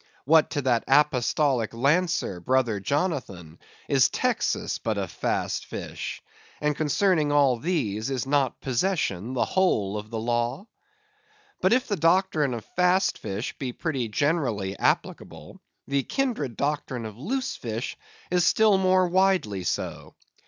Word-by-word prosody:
What 155 Hz, +2 st, +5 dB
to 145 Hz, -, -2 dB
that 120 Hz, -3 st, +2 dB
apostolic 135 Hz, -4 st, +2 dB
lancer, 145 Hz, -, +1 dB
Brother 120 Hz, +1 st, +1 dB
Jonathan, 100 Hz, -, -3 dB, 0.3 s
is -, -, +4 dB
Texas -, -, -1 dB
but -, -, -2 dB
a -, -, -2 dB
Fast -, -, -2 dB
Fish? -, -, -6 dB, 0.4 s
And 150 Hz, 0 st, 0 dB
concerning 155 Hz, +1 st, +1 dB
all 140 Hz, -4 st, +3 dB
these, 115 Hz, -, -1 dB
is 130 Hz, -2 st, -2 dB
not 140 Hz, -1 st, +1 dB
Possession 125 Hz, -, -1 dB
the 125 Hz, -, +2 dB
whole 105 Hz, -, +1 dB
of 105 Hz, +1 st, -10 dB
the 115 Hz, -, -4 dB
law? 120 Hz, -, -1 dB, 1.0 s
But 185 Hz, -, +3 dB
if 250 Hz, +2 st, +2 dB
the 205 Hz, -, -1 dB
doctrine 165 Hz, -5 st, +2 dB
of 115 Hz, -, -7 dB
Fast 180 Hz, +1 st, +2 dB
Fish 100 Hz, +5 st, -4 dB
be 130 Hz, -3 st, -3 dB
pretty 135 Hz, -7 st, -2 dB
generally 115 Hz, -, 0 dB
applicable, -, -, -2 dB, 0.3 s
the 140 Hz, 0 st, +1 dB
kindred 215 Hz, -, -2 dB
doctrine 140 Hz, -5 st, -2 dB
of 110 Hz, +1 st, -9 dB
Loose 255 Hz, -, -2 dB
Fish 115 Hz, +1 st, -4 dB, 0.4 s
is 180 Hz, -1 st, +3 dB
still 215 Hz, 0 st, +4 dB
more 185 Hz, -1 st, +3 dB
widely 180 Hz, -, +1 dB
so. -, -, -4 dB
140 Hz, 140 wpm, -26 LUFS, 115-175 Hz, 1.0 s, What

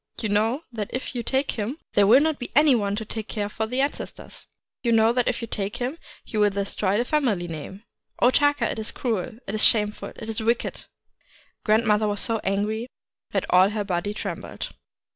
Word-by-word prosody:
You 220 Hz, -, -2 dB
know 225 Hz, +8 st, +1 dB
that 210 Hz, -3 st, -3 dB
if 255 Hz, -, -4 dB
you 245 Hz, -, -2 dB
take 265 Hz, +3 st, 0 dB
him 225 Hz, +6 st, -3 dB, 0.2 s
there 200 Hz, -1 st, +5 dB
will 250 Hz, +6 st, +7 dB
not 315 Hz, -1 st, +1 dB
be 245 Hz, -, -5 dB
any 295 Hz, -1 st, +6 dB
one 205 Hz, -4 st, +1 dB
to 220 Hz, +1 st, -4 dB
care 215 Hz, -1 st, -4 dB
for 220 Hz, +1 st, -3 dB
the 250 Hz, +4 st, 0 dB
ancestors. 280 Hz, +1 st, -5 dB, 0.3 s
You 235 Hz, -, +1 dB
know 225 Hz, 0 st, +5 dB
that 245 Hz, -1 st, +1 dB
if -, -, -1 dB
you -, -, -3 dB
take 200 Hz, -1 st, -3 dB
him, 260 Hz, +7 st, -3 dB, 0.3 s
you 215 Hz, -, -3 dB
will 210 Hz, 0 st, +5 dB
destroy 200 Hz, 0 st, -1 dB
the 240 Hz, -, +1 dB
family 245 Hz, -, +1 dB
name! 165 Hz, +5 st, -7 dB, 0.4 s
O 245 Hz, -, +5 dB
Taka, 290 Hz, -4 st, +2 dB
it -, -, -4 dB
is 215 Hz, -, -2 dB
cruel! 225 Hz, -2 st, -2 dB
it 195 Hz, -, -5 dB
is 215 Hz, -, +2 dB
shameful! 210 Hz, -2 st, +2 dB
it -, -, -8 dB
is 225 Hz, 0 st, -3 dB
wicked! 235 Hz, +2 st, -1 dB, 0.4 s
' -, -, -31 dB
Grandmother 215 Hz, -1 st, +3 dB
was 205 Hz, -1 st, -1 dB
so 225 Hz, -1 st, +1 dB
angry 210 Hz, +4 st, -1 dB, 0.4 s
that -, -, -1 dB
all 185 Hz, +2 st, +6 dB
her 210 Hz, 0 st, -2 dB
body 190 Hz, +1 st, -1 dB
trembled. 210 Hz, -, -5 dB
220 Hz, 205 wpm, -25 LUFS, 205-245 Hz, 0.4 s, will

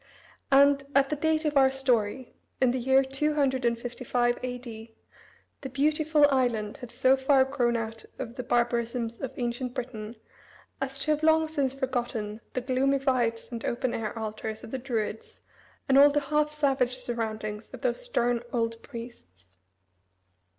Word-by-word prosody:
And, 280 Hz, 0 st, +6 dB
at 275 Hz, 0 st, +4 dB
the -, -, +1 dB
date 315 Hz, +1 st, 0 dB
of 300 Hz, -1 st, 0 dB
our 270 Hz, -1 st, +6 dB
story, 255 Hz, -2 st, 0 dB, 0.3 s
in 255 Hz, -2 st, +4 dB
the 255 Hz, -, -1 dB
year 265 Hz, +2 st, +4 dB
255 255 Hz, -4 st, 0 dB
A.D., 235 Hz, -3 st, -7 dB, 0.7 s
the 270 Hz, -, -5 dB
beautiful 300 Hz, +2 st, +3 dB
island 235 Hz, -6 st, 0 dB
had 245 Hz, -, -9 dB
so 255 Hz, +3 st, +3 dB
far 265 Hz, 0 st, +4 dB
grown 250 Hz, -3 st, 0 dB
out 225 Hz, 0 st, -5 dB
of 230 Hz, -, -5 dB
the 250 Hz, -, -5 dB
barbarisms 235 Hz, -1 st, -1 dB
of 265 Hz, -, -3 dB
ancient 245 Hz, +1 st, -3 dB
Britain 230 Hz, -3 st, -5 dB, 0.7 s
as 270 Hz, 0 st, -1 dB
to 305 Hz, +3 st, 0 dB
have 305 Hz, 0 st, +1 dB
long 315 Hz, 0 st, +4 dB
since 280 Hz, -4 st, -1 dB
forgotten 240 Hz, -5 st, -3 dB
the 255 Hz, -, -1 dB
gloomy 260 Hz, +2 st, +1 dB
rites 250 Hz, -4 st, 0 dB
and 230 Hz, -1 st, -5 dB
open 245 Hz, +1 st, -1 dB
air 225 Hz, 0 st, -3 dB
altars 220 Hz, 0 st, -5 dB
of -, -, -9 dB
the 265 Hz, -, -3 dB
Druids, 225 Hz, -4 st, -4 dB, 0.5 s
and 270 Hz, 0 st, +5 dB
all 285 Hz, +1 st, +9 dB
the 290 Hz, +1 st, +1 dB
half 300 Hz, 0 st, +2 dB
savage 270 Hz, -4 st, +1 dB
surroundings 220 Hz, -3 st, -4 dB
of -, -, -10 dB
those -, -, -1 dB
stern 245 Hz, -, 0 dB
old 230 Hz, -1 st, -1 dB
priests. 230 Hz, -, -11 dB
250 Hz, 155 wpm, -28 LUFS, 230-275 Hz, 0.7 s, all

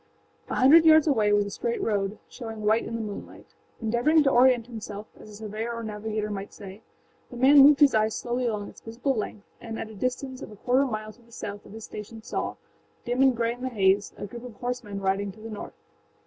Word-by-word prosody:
A -, -, -2 dB
hundred 295 Hz, +6 st, +7 dB
yards 315 Hz, -1 st, +7 dB
away 220 Hz, -9 st, +2 dB
was 205 Hz, 0 st, +3 dB
a 200 Hz, -, -6 dB
straight 235 Hz, +3 st, -2 dB
road, 205 Hz, -1 st, -1 dB
showing 225 Hz, -4 st, -8 dB
white 220 Hz, +2 st, +3 dB
in 230 Hz, -, -5 dB
the 230 Hz, -, -3 dB
moonlight. 210 Hz, -2 st, -8 dB, 0.3 s
Endeavoring 240 Hz, +8 st, +3 dB
to 275 Hz, -, +3 dB
orient 245 Hz, -2 st, +5 dB
himself, 220 Hz, -3 st, -7 dB
as -, -, -13 dB
a 210 Hz, -, -11 dB
surveyor 215 Hz, +2 st, -5 dB
or 230 Hz, -, -5 dB
navigator 215 Hz, 0 st, -3 dB
might 200 Hz, 0 st, -6 dB
say, 200 Hz, +1 st, -10 dB, 0.5 s
the 245 Hz, -, -9 dB
man 275 Hz, +4 st, +7 dB
moved 285 Hz, +2 st, +7 dB
his 285 Hz, -2 st, +7 dB
eyes 215 Hz, 0 st, +2 dB
slowly 245 Hz, 0 st, -2 dB
along 210 Hz, -3 st, -2 dB
its -, -, -14 dB
visible 240 Hz, +5 st, -2 dB
length 210 Hz, -2 st, -5 dB, 0.2 s
and 225 Hz, -1 st, -6 dB
at 220 Hz, -, -6 dB
a -, -, -11 dB
distance 255 Hz, +4 st, -3 dB
of -, -, -7 dB
a -, -, -11 dB
quarter 255 Hz, +6 st, +2 dB
mile 215 Hz, -2 st, -5 dB
to 240 Hz, -, -23 dB
the 235 Hz, 0 st, -23 dB
south 205 Hz, -2 st, -7 dB
of -, -, -13 dB
his 220 Hz, 0 st, -9 dB
station 215 Hz, +2 st, -9 dB
saw, -, -, -3 dB, 0.5 s
dim 245 Hz, +2 st, 0 dB
and 265 Hz, -3 st, +4 dB
gray 230 Hz, 0 st, +1 dB
in 245 Hz, -, -13 dB
the 260 Hz, -, -2 dB
haze, 200 Hz, -3 st, +2 dB
a -, -, -5 dB
group 235 Hz, +4 st, -9 dB
of 245 Hz, -3 st, -9 dB
horsemen 245 Hz, -5 st, -4 dB
riding 195 Hz, +1 st, 0 dB
to 215 Hz, -, -17 dB
the 225 Hz, +1 st, -8 dB
north. 210 Hz, -, -7 dB
225 Hz, 230 wpm, -26 LUFS, 210-250 Hz, 0.5 s, hundred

